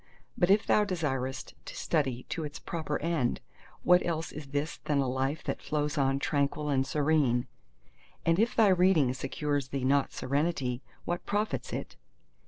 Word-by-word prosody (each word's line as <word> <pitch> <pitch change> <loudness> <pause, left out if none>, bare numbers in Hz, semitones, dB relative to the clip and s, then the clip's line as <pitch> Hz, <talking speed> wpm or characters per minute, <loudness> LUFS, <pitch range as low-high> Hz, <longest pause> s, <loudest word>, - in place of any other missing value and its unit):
But 175 - +2
if 200 +2 +5
thou 210 - +4
desirest 145 -9 -2
to - - -8
study 135 -6 0
to 165 - -3
its 150 0 -5
proper 155 -3 -3
end, 160 -8 0 0.4
what 180 0 +5
else 165 -1 -2
is 150 -1 -8
this 145 +3 -2
than 150 - +1
a 135 -1 +2
life 135 +4 -1
that - - -3
flows 150 -1 -1
on 135 -1 +2
tranquil 145 +1 0
and 135 -1 +1
serene? 145 -5 +2 0.8
And 165 +2 +3
if 230 +2 +2
thy 220 -3 +6
reading 180 -8 +4
secures 140 +1 -2
thee 135 -1 -3
not 140 +1 +3
serenity, 140 -3 -1 0.2
what 175 0 -3
profits 210 +1 -1
it? - - -5
145 Hz, 165 wpm, -30 LUFS, 135-165 Hz, 0.8 s, thy